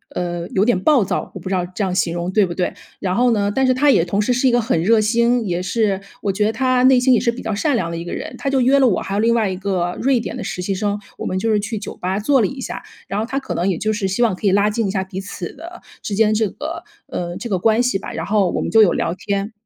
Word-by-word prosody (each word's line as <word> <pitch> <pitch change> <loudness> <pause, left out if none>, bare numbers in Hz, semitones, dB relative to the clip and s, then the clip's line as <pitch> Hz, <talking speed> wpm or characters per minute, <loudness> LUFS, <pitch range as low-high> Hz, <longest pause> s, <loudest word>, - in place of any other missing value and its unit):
呃， 175 -1 -3
有 195 - +1
点 235 -6 +2
暴 270 +3 +4
躁。 190 - -3
我 - - -5
不 185 - -7
知 - - -1
道 180 -1 0
这 185 +4 -4
样 185 -2 -1
形 180 -2 0
容 175 +1 -3
对 205 +1 +3
不 175 - -5
对？ 180 0 -1 0.3
然 185 -1 -1
后 245 +3 +3
呢， 205 -2 +1
但 265 +2 +2
是 255 - +4
他 285 +3 +4
也 165 - +4
同 195 +3 -1
时 210 - 0
是 250 +2 +2
一 - - +4
个 240 - +3
很 220 -8 0
热 220 +6 +4
心， 235 +2 +2
也 175 -2 -1
是 195 +1 0 0.2
我 200 - +1
觉 210 +2 0
得 215 - +2
他 255 +2 +1
内 260 -1 +6
心 255 +1 +4
也 235 - +4
是 235 - +1
比 235 - -8
较 220 - -2
善 275 +7 +1
良 170 -7 -1
的 170 - -4
一 170 - -5
个 - - -5
人， - - -5
他 275 - -1
就 270 -1 +2
约 265 +3 +4
了 265 - +5
我 205 - +1
还 195 - -5
有 200 - 0
另 230 +2 +3
外 225 -3 +2
一 185 - -3
个 185 -2 -1
瑞 265 -1 +3
典 230 - -5
的 - - -5
实 180 - -4
习 195 - -1
生， 205 +1 -1 0.2
我 - - -6
们 185 - -2
就 225 +4 0
是 210 - +3
去 215 +2 -4
酒 205 - -7
吧 185 +2 -2
坐 265 +4 +3
了 205 - +2
一 270 - -8
下。 - - -5 0.3
然 200 - -2
后 220 - -1
他 260 +3 -4
可 270 - -5
能 180 +3 0
也 185 - 0
就 215 +4 -1
是 210 -2 -1
希 190 +5 -1
望 230 - +2
可 200 - -2
以 - - +4
拉 200 +2 +3
近 215 0 -1
一 - - -1
下 190 -1 -1
彼 190 0 -7
此 190 -3 -7
的 340 +4 -11 0.2
之 205 - -3
间 215 0 +3
这 215 -1 +1
个， 330 - -6 0.2
呃， 175 0 -4
这 240 - -6
个 190 -3 0
关 225 +5 +3
系 245 -6 0
吧。 - - -7
然 - - -4
后 200 -3 +2
我 - - -1
们 - - -3
就 225 - +6
有 195 -5 +5
聊 165 - -1
天。 200 +3 -3
210 Hz, 350 characters per minute, -20 LUFS, 190-240 Hz, 0.3 s, 内